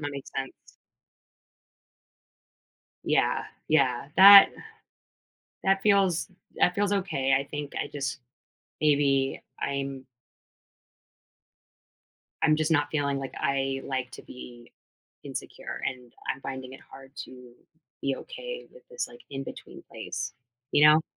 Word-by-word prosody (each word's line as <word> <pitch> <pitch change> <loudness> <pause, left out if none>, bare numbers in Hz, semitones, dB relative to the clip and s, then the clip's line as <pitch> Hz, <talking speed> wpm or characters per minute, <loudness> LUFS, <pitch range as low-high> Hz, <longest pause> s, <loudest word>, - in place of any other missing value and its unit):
that 145 -1 -3
makes 140 -1 -8
sense. 135 -1 -7 2.3
Yeah, - - +1 0.2
yeah, 135 -4 +2
that 200 +1 +11 1.2
that 195 0 +3
feels 195 -3 +3 0.3
that 180 - +3
feels 205 +1 +1
okay 155 -9 +1
I 135 - -3
think 145 0 -6
I - - -5
just 140 0 -4 0.6
maybe 140 -3 +2 0.2
I'm 140 -1 -3 2.4
I'm 155 - +4
just 155 +1 0
not 145 -2 +2
feeling, 140 -2 0
like, 135 -1 -6
I, 135 -1 0
like, 130 -2 -3
to - - -10
be 120 -1 -12 0.5
insecure, - - -7
and 125 -2 -5 0.2
I'm - - -15
finding 130 -1 -6
it - - -12
hard 135 0 -14
to 125 -1 -14 0.5
be 135 -1 0
okay - - -8
with - - -17
this, 475 0 -3
like, 240 - -15
in 135 -1 -5
between - - -10
place, - - -5 0.4
you 150 - +6
know? 155 +1 +6
140 Hz, 120 wpm, -27 LUFS, 135-175 Hz, 2.4 s, that